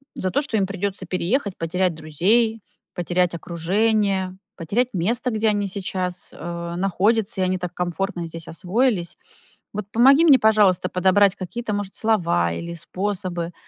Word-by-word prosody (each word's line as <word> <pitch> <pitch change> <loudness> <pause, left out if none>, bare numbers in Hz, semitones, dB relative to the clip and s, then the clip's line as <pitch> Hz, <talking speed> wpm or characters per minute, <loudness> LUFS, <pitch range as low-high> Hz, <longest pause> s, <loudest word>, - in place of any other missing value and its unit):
за 185 - -2
то, 285 - +1
что 260 -7 -1
им 195 -2 +1
придётся 195 -1 -3
переехать, 195 +4 -1
потерять 180 +1 0
друзей, 210 +9 +1 0.3
потерять 175 0 0
окружение, 190 +2 0 0.2
потерять 230 +10 0
место, 235 +8 0
где 220 0 +1
они 205 -1 0
сейчас, 185 -2 -4
э, 170 0 -6
находятся, 195 +3 +1
и - - +3
они 185 0 +1
так 180 -1 -5
комфортно 180 0 -3
здесь 165 -1 -9
освоились. 185 +1 -1 0.6
Вот 210 -1 -4
помоги 270 +7 +6
мне, 285 -5 +8
пожалуйста, 210 -5 +4
подобрать 190 +2 +3
какие-то, 210 +4 -5
может, 205 -1 -4
слова 170 - +1
или 170 - -5
способы, 180 -1 -4
190 Hz, 145 wpm, -22 LUFS, 175-215 Hz, 0.6 s, мне